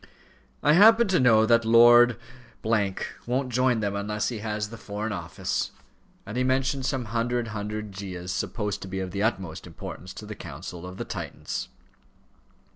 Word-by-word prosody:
"I 150 - +5
happen 225 +6 +7
to 185 - +3
know 115 -4 +5
that 115 +1 +4
Lord 120 0 +7 0.5
won't 115 +4 -1
join 125 -2 +2
them 100 -1 -1
unless 105 +1 -1
he 120 -3 -5
has 105 0 -3
the 115 - -8
Foreign 105 +1 -4
Office," 100 - -3 0.6
and 105 - -7
he 125 - +2
mentioned 130 +1 +1
some 130 -3 -1
hundred 120 0 0
handed 105 0 -4
Gyas 95 -2 -6
supposed 105 -3 -3
to - - -6
be 95 0 -4
of 95 -1 -4
the 100 - -3
utmost 95 -7 -2
importance 90 - -8
to 105 - -8
the 105 - -6
counsels 85 0 -8
of 90 +1 -8
the - - -4
Titans. - - -5
110 Hz, 165 wpm, -26 LUFS, 100-120 Hz, 0.6 s, happen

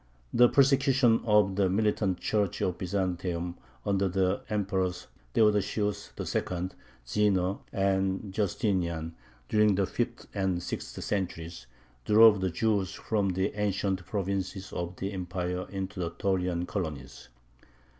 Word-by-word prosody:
The 120 0 +6
persecutions 135 -3 +4
of 105 -3 +3
the 95 -2 +3
militant 100 -2 +1
Church 105 -4 0
of 90 -1 -1
Byzantium 90 -2 -2 0.3
under 100 -1 +2
the 95 +1 +1
Emperors 95 -3 -1 0.3
Theodosius 105 -1 +1
II., 90 0 -2 0.4
Zeno, 95 +5 +1
and 95 0 0
Justinian, 90 -5 -1 0.3
during 105 +2 +4
the 100 0 +2
fifth 120 +4 -3
and 95 -3 -1
sixth - - -5
centuries, 85 -9 -3 0.4
drove 105 -2 +7
the 95 - +1
Jews 100 +1 0
from 105 -3 0
the 95 +2 0
ancient 100 -2 -1
provinces 95 -1 -3
of 85 +1 -4
the 95 +3 -4
Empire 90 0 -3
into 95 0 -5
the 85 -2 -1
Taurian 90 -1 -1
colonies. 75 -10 -5
95 Hz, 120 wpm, -29 LUFS, 90-105 Hz, 0.4 s, drove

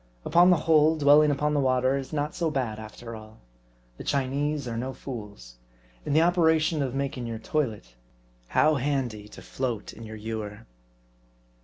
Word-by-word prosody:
Upon 175 +1 +5
the 180 - +5
whole, 160 0 +4
dwelling 150 +1 +6
upon 150 +1 0
the 145 - +2
water 130 0 +2
is 135 -1 -5
not 150 0 -2
so 170 -2 -1
bad 125 -7 -2
after 115 +2 -9
all. 110 0 -12 0.6
The - - -8
Chinese 140 +1 -1
are 115 - -4
no 130 +3 -3
fools. 105 - -9 0.5
In - - 0
the 160 +2 +5
operation 160 -3 +3
of 135 -2 -2
making 135 -3 -3
your 115 -1 -4
toilet, 110 - -3 0.5
how 155 - +3
handy 125 -6 -2
to - - -13
float 120 -6 -4
in - - -13
your 110 -1 -8
ewer 105 - -6
135 Hz, 165 wpm, -26 LUFS, 110-150 Hz, 0.6 s, dwelling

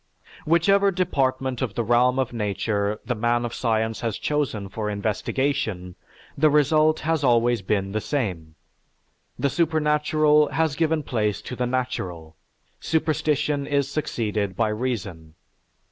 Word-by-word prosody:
"Whichever 195 +5 +4
department 135 -8 -1
of 120 -6 -2
the 120 - 0
realm 120 +3 +3
of 130 -3 -1
Nature 105 -1 -1
the 125 - -1
man 120 +1 0
of 120 - -5
science 110 -2 -1
has 115 -3 -2
chosen 140 -9 -2
for 105 +2 -4
investigation, 105 -1 -2 0.4
the 155 +2 +4
result 155 +1 +3
has 160 -1 0
always 120 -2 +3
been 95 0 -1
the 110 +1 -2
same; 90 - -3 0.8
the - - +1
supernatural 150 -1 +2
has 160 -3 +1
given 160 -1 +1
place 105 -6 -1
to 125 - -6
the 125 0 -1
natural, 90 -11 -3 0.4
superstition 150 -2 0
is 140 -1 0
succeeded 105 -9 -2
by 110 +1 +1
reason. 100 -9 -4
125 Hz, 130 wpm, -24 LUFS, 105-150 Hz, 0.8 s, Whichever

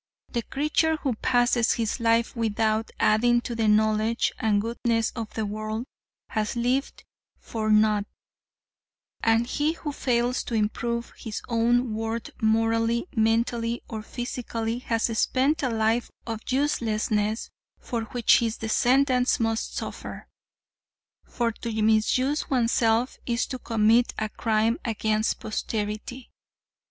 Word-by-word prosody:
The 235 - -1
creature 305 +5 0
who 275 -4 -1
passes 240 0 +2
his 230 +1 -2
life 230 +1 +2
without 220 -1 0
adding 240 +3 +4
to 240 - -5
the 225 -1 0
knowledge 215 +2 +2
and 215 -4 +2
goodness 230 +1 0
of 225 -3 -6
the 220 - -1
world 215 +3 -4 0.4
has 215 0 -2
lived 250 +3 -1 0.3
for 220 -1 -4
naught, 215 -1 +4 1.2
and 225 +1 +3
he 295 +5 0
who 310 -3 -5
fails 245 -2 0
to 235 - -3
improve 235 +2 -1
his 220 -2 -6
own 240 0 +2
worth 225 +1 -3
morally, 225 +2 +2
mentally 230 +1 +1
or 220 -2 -5
physically 235 0 -4
has 230 -2 -1 0.2
spent 270 +5 +2
a 260 - 0
life 225 +1 +1 0.2
of 225 -2 -4
uselessness 220 -5 0 0.3
for 230 -2 -3
which 235 +1 +3
his 230 -1 -1
descendants 250 +3 +2
must 225 -1 -1
suffer; - - -6 1.0
for 235 -1 -1
to 225 0 -5
misuse 240 +7 +2
oneself 235 -1 +2
is 235 -1 +1
to 255 - -6
commit 225 +1 +2
a 215 0 -2
crime 220 +1 +1
against 220 -1 0
posterity. 215 +3 -4
230 Hz, 125 wpm, -26 LUFS, 220-245 Hz, 1.2 s, adding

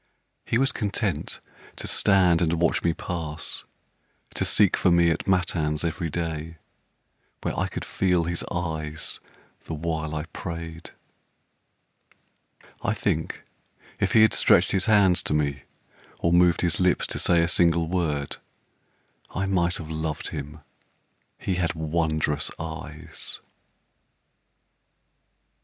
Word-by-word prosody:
He 115 - +1
was 135 +2 +2
content 100 -3 -2 0.4
to - - -6
stand 90 -4 +4
and 85 -1 +2
watch 85 - +2
me 85 - +3
pass, 80 -2 -5 0.7
To - - -1
seek 100 -3 +4
for - - +2
me 85 -1 +5
at - - -2
matins 80 -5 +1
every 85 0 -2
day, 80 0 -4 0.9
Where - - -1
I - - 0
could - - -6
feel 90 -3 +1
his 85 +1 -2
eyes 80 -3 -3 0.5
the 80 - -4
while 80 -1 -2
I 75 - -2
prayed. 85 -1 -6 1.9
I - - 0
think - - -2 0.6
if - - +1
he 110 - +7
had 110 - +5
stretched - - +4
his 95 -1 +1
hands 100 -5 +5
to 75 - -1
me, 70 -2 -1 0.5
Or 85 - +1
moved 85 -1 +5
his 85 -2 0
lips 90 -1 +3
to - - -3
say 85 -1 +4
a - - +2
single 85 -1 +3
word, 80 -5 -1 0.9
I 95 - -2
might 90 -3 +1
have 80 -2 -7
loved 80 -1 -3
him 75 0 -7 0.8
he 95 -2 -2
had 85 0 0
wondrous 80 -2 0
eyes. 80 0 -7
85 Hz, 130 wpm, -25 LUFS, 80-90 Hz, 1.9 s, he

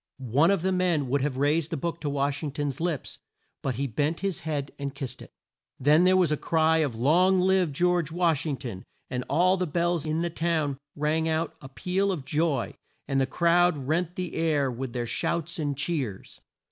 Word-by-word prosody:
One 155 +6 +5
of 195 -4 +1
the 190 - +1
men 175 -7 +1
would 140 +1 +1
have 135 -2 -1
raised 150 +3 +1
the 165 - -3
book 170 +4 -3
to 150 - -2
Wash 140 0 -1
ing 155 - -2
ton's 145 -2 -3
lips, 165 -5 -3 0.4
but 130 -3 -2
he 140 +4 -1
bent 145 +7 -1
his 195 -4 -1
head 145 -3 -3
and 140 -1 -4
kissed 135 -4 -6
it. - - -12 0.5
Then 150 +6 +5
there 185 0 +5
was 175 -5 +3
a 150 - +1
cry 160 +1 +2
of 145 -7 0
"Long 175 +10 +4
live 185 -3 +3
George 175 +1 +1
Wash 165 -4 +1
ing 140 -3 -1
ton!" 115 -9 -7 0.3
and 125 -1 -2
all 185 +3 +3
the 180 -1 -1
bells 170 0 0
in 155 +2 0
the 170 - -2
town 160 -5 -1 0.2
rang 155 +2 0
out 160 +1 -1
a 135 - -10
peal 190 +7 0
of 155 -8 -4
joy, 150 -5 0 0.3
and 135 0 +1
the 135 - +1
crowd 170 +2 +3
rent 160 +6 -1
the 180 -2 -4
air 150 -5 +1
with 125 0 -5
their 120 -1 -2
shouts 170 +8 -1
and 145 -3 -2
cheers. 140 - -3
155 Hz, 210 wpm, -27 LUFS, 140-175 Hz, 0.5 s, One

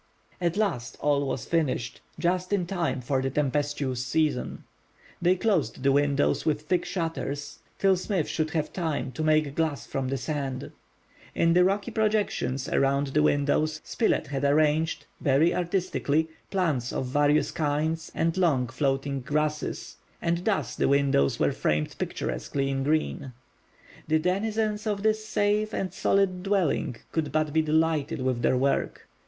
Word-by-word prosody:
At 175 +1 0
last, 175 - -1
all 145 -1 +1
was 130 -2 -3
finished, 145 -8 -1 0.2
just 180 +3 0
in 195 -3 +1
time 170 -7 -1
for 130 +2 0
the 135 - -1
tempestuous 140 -2 -1
season. 145 -1 -1 0.6
They 180 +1 +4
closed 185 - 0
the 140 - +4
windows 145 0 +2
with 150 -2 0
thick 175 +3 0
shutters 150 -4 -4 0.2
till 195 -1 +4
Smith 185 -3 -1
should 155 -1 -1
have 155 -2 -2
time 160 -7 -2
to 155 - -4
make 155 -2 +2
glass 155 -4 -1
from 135 -1 -3
the 135 +1 -1
sand. 135 -3 -4 0.6
In 165 0 +3
the 180 +1 +5
rocky 195 +2 0
projections 210 -11 0
around 140 +1 +1
the 150 +3 +2
windows 150 +1 +2
Spilett 225 - 0
had 140 -1 -4
arranged, 155 +3 +2
very 150 +4 +3
artistically, 170 -4 0 0.2
plants 155 - 0
of - - -2
various 145 +3 +2
kinds 160 +2 -1
and 165 0 +1
long 140 -10 +2
floating 135 +2 -1
grasses, 150 -4 -2 0.2
and 170 +1 -1
thus 210 -3 0
the - - +1
windows 140 - +2
were - - +3
framed 75 0 -1
picturesquely 135 0 -2
in 135 0 -1
green. 145 -2 -1 0.7
The 155 +1 +3
denizens 210 +5 -1
of 205 -1 -1
this 215 0 +2
safe 210 0 0
and 190 - -2
solid 195 -2 +1
dwelling 185 - 0 0.2
could 160 -3 -1
but 155 -1 0
be 160 - +4
delighted 160 0 +1
with 130 -2 0
their 125 - +3
work. 135 +2 0
155 Hz, 150 wpm, -27 LUFS, 140-180 Hz, 0.7 s, the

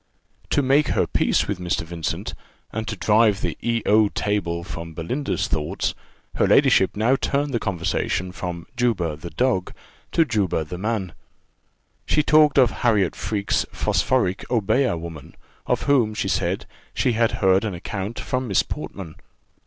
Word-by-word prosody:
To 145 - +2
make 140 +3 +3
her - - +1
peace - - +1
with 100 -3 -3
Mr. 90 +1 -1
Vincent, 85 -1 -4 0.4
and 110 0 -4
to 110 - -3
drive 105 +1 +3
the - - -2
E 115 -1 0
O 105 0 +4
table 90 -6 -1
from 85 -1 -7
Belinda's 125 - -2
thoughts, 75 -3 -2 0.4
her - - +3
ladyship - - +4
now 115 +5 +3
turned 140 +1 -1
the 115 - +1
conversation 90 -1 -1
from 90 -2 -5
Juba 105 -11 0
the 85 +3 -8
dog, 95 +1 0 0.4
to 165 - +4
Juba 100 - 0
the 90 +3 -7
man. 105 -4 -2 0.9
She 150 - +3
talked 150 -1 +5
of 125 -4 +5
Harriot 105 -7 +2
Freke's 100 -2 -1
phosphoric 110 -8 0
Obeah 120 -2 +1
woman, 80 -2 -9 0.3
of - - 0
whom, 120 -7 +2
she - - -1
said, - - -1 0.3
she 125 - +2
had 115 0 +1
heard 95 0 +3
an 105 -5 -3
account 100 +4 -5
from 130 0 -2
Miss 100 - +3
Portman. 90 -6 -7
105 Hz, 155 wpm, -23 LUFS, 90-120 Hz, 0.9 s, talked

